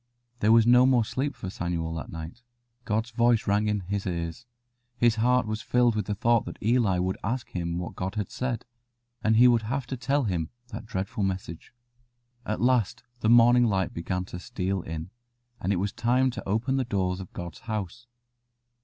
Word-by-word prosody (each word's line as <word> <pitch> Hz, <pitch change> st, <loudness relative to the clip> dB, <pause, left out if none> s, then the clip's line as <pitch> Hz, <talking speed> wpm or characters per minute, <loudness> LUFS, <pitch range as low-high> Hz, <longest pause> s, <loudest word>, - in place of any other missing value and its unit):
There 105 Hz, -, +3 dB
was 115 Hz, -1 st, +6 dB
no 125 Hz, +2 st, +6 dB
more 125 Hz, -4 st, +4 dB
sleep 135 Hz, +5 st, -2 dB
for 95 Hz, -6 st, -6 dB
Samuel 85 Hz, -3 st, -3 dB
that 80 Hz, -, -6 dB
night. 80 Hz, +7 st, -8 dB, 0.4 s
God's 110 Hz, +2 st, -1 dB
voice 115 Hz, 0 st, +3 dB
rang 105 Hz, +1 st, +2 dB
in 105 Hz, -1 st, 0 dB
his 100 Hz, +2 st, -3 dB
ears; 85 Hz, +5 st, -4 dB, 0.5 s
his 120 Hz, -2 st, +3 dB
heart 125 Hz, +2 st, +3 dB
was 110 Hz, 0 st, -3 dB
filled 120 Hz, -2 st, +2 dB
with 105 Hz, -3 st, -2 dB
the 105 Hz, -, -1 dB
thought 115 Hz, +2 st, +2 dB
that -, -, -7 dB
Eli 110 Hz, -4 st, +2 dB
would 95 Hz, +1 st, -1 dB
ask 120 Hz, +4 st, -3 dB
him 85 Hz, -1 st, -3 dB
what 90 Hz, -, -5 dB
God 95 Hz, +2 st, -4 dB
had 105 Hz, -3 st, -3 dB
said, 125 Hz, -3 st, -3 dB, 0.6 s
and 110 Hz, +1 st, +3 dB
he 120 Hz, +3 st, +7 dB
would 120 Hz, -2 st, +4 dB
have 130 Hz, +4 st, -3 dB
to 130 Hz, -, -4 dB
tell 135 Hz, +3 st, 0 dB
him 85 Hz, -7 st, -1 dB, 0.2 s
that 110 Hz, -1 st, -8 dB
dreadful 105 Hz, +4 st, -3 dB
message. 90 Hz, -4 st, -4 dB, 0.8 s
At 105 Hz, -, -1 dB
last 120 Hz, -4 st, +2 dB, 0.2 s
the 110 Hz, -, +1 dB
morning 120 Hz, +1 st, +6 dB
light 95 Hz, -5 st, 0 dB
began 90 Hz, +2 st, -3 dB
to 90 Hz, -, -8 dB
steal 95 Hz, +1 st, -2 dB
in, 80 Hz, +2 st, -6 dB, 0.5 s
and 95 Hz, -, -1 dB
it -, -, +2 dB
was 95 Hz, +3 st, -1 dB
time 125 Hz, +3 st, +2 dB
to 115 Hz, -5 st, -7 dB
open 120 Hz, +6 st, +1 dB
the 135 Hz, -, +1 dB
doors 95 Hz, -4 st, -1 dB
of 95 Hz, -, -9 dB
God's 85 Hz, -1 st, -7 dB
house. 110 Hz, +1 st, -5 dB
110 Hz, 195 wpm, -27 LUFS, 95-120 Hz, 0.8 s, he